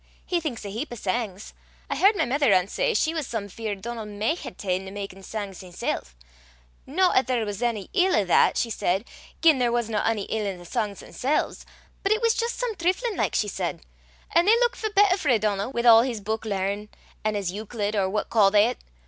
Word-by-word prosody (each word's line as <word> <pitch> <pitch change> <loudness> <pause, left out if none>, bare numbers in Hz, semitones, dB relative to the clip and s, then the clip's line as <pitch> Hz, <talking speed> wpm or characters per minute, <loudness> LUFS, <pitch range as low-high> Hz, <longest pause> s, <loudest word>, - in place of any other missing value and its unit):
He 355 - 0
thinks 280 -10 -5
a - - -4
heap 235 +9 -3
o' - - -5
sangs. 205 -1 -3 0.3
I - - -2
h'ard 400 +3 +5
my - - +1
mither 275 0 +2
ance 185 0 +2
say - - +1
she 320 - +2
was 315 -5 -3
some 220 -3 -3
feart 205 0 -5
Donal 230 -1 -5
micht 210 +10 -2
hae - - -5
ta'en 185 0 -3
to 190 - -8
makin' 195 -1 -7
sangs 200 -1 -6
himsel'; 180 -2 -3 0.8
no 360 +7 +2
'at 255 - +3
there 245 -3 0
was 205 +1 -5
ony 230 -5 -1
ill 375 -1 +3
i' 210 - +3
that, 180 - +4
she 230 - 0
said, 195 +1 0 0.4
gien 315 -5 +6
there 240 -1 +2
wasna 225 -3 0
ony 225 -3 0
ill 210 -1 -2
i' 185 - -8
the 175 - -13
sangs 210 +1 -3
themsel's; 280 +4 -2 0.3
but 395 - 0
it 435 - +3
was 460 -1 +3
jist 465 0 -2
some 485 -2 -1
trifflin' 375 +6 0
like, - - 0
she - - +1
said, - - -3 0.5
an' 340 +1 +4
they 430 +3 +6
luikit 485 0 +2
for 435 - -2
better 405 -2 +4
frae 280 - +2
Donal, 210 +1 -1
wi' 235 - -1
a' 230 -1 +8
his 245 -4 -3
buik 220 +2 -3
lear, 200 0 -2 0.4
an' 215 0 0
his 195 -3 -1
Euclid 210 +1 -3
or 195 -2 +1
what 210 +2 -2
ca' 210 -4 +5
they 210 +4 +4
't? - - -26
225 Hz, 225 wpm, -25 LUFS, 205-310 Hz, 0.8 s, a